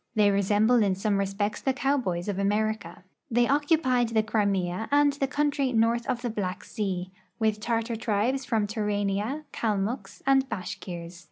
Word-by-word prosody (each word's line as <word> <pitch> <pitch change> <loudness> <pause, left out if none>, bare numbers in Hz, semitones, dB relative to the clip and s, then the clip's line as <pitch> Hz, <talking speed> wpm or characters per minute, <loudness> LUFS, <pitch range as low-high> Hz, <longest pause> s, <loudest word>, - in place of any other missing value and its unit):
They 210 -2 +5
resemble 210 +4 +3
in 195 -3 +2
some 200 +1 0
respects 200 +2 -1
the 265 - +1
cowboys 255 -11 0
of 200 -2 -2
America. 210 0 -1 0.3
They 240 0 +3
occupied 285 -4 +2
the 220 -1 +2
Crimea 200 -2 0
and 285 0 +4
the 275 -1 -1
country 285 -1 0
north 230 +1 +2
of 250 -2 -2
the 240 - -1
Black 190 -4 -3
sea, 185 -3 -3 0.3
with 220 -2 +1
Tartar 230 +1 -1
tribes 230 +5 0
from 225 -4 0
Turania, 210 +5 -1
Kalmucks, 215 +2 -2
and 270 0 +3
Bashkirs. 175 -2 -6
220 Hz, 155 wpm, -27 LUFS, 200-250 Hz, 0.3 s, They